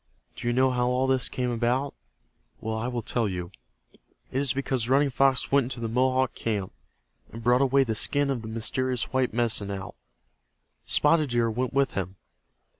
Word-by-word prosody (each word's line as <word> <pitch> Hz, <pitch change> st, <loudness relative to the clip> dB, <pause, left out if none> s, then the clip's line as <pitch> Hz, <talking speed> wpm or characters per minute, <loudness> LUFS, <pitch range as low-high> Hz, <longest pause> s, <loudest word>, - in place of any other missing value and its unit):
Do 120 Hz, -, -5 dB
you 120 Hz, -, +2 dB
know 130 Hz, +1 st, +3 dB
how 125 Hz, -1 st, +1 dB
all 125 Hz, +1 st, +1 dB
this 130 Hz, -2 st, +1 dB
came 125 Hz, -1 st, -2 dB
about? 125 Hz, +4 st, 0 dB, 0.7 s
Well, 110 Hz, 0 st, -3 dB
I 110 Hz, +2 st, -2 dB
will 120 Hz, -2 st, -3 dB
tell 115 Hz, -1 st, 0 dB
you. 90 Hz, -2 st, -5 dB, 0.4 s
It -, -, -26 dB, 0.4 s
is 140 Hz, -2 st, +1 dB
because 130 Hz, -3 st, -2 dB
Running 140 Hz, +1 st, +3 dB
Fox 135 Hz, 0 st, +2 dB
went 140 Hz, -2 st, +4 dB
into 125 Hz, -1 st, -2 dB
the 115 Hz, -, -2 dB
Mohawk 130 Hz, +2 st, +1 dB
camp, 105 Hz, -4 st, -3 dB, 0.6 s
and 115 Hz, 0 st, -9 dB
brought 125 Hz, +2 st, +4 dB
away 135 Hz, 0 st, +4 dB
the 115 Hz, -4 st, -2 dB
skin 140 Hz, +5 st, +2 dB
of 125 Hz, -4 st, -2 dB
the 110 Hz, -, -8 dB
mysterious 125 Hz, +3 st, -2 dB
white 130 Hz, -1 st, +1 dB
Medicine 110 Hz, -3 st, -1 dB
Owl. 95 Hz, -1 st, -5 dB, 0.9 s
Spotted 150 Hz, -1 st, +3 dB
Deer 120 Hz, -1 st, +1 dB
went 125 Hz, +3 st, -2 dB
with 140 Hz, -2 st, +2 dB
him. 95 Hz, 0 st, -4 dB
125 Hz, 185 wpm, -26 LUFS, 115-130 Hz, 0.9 s, went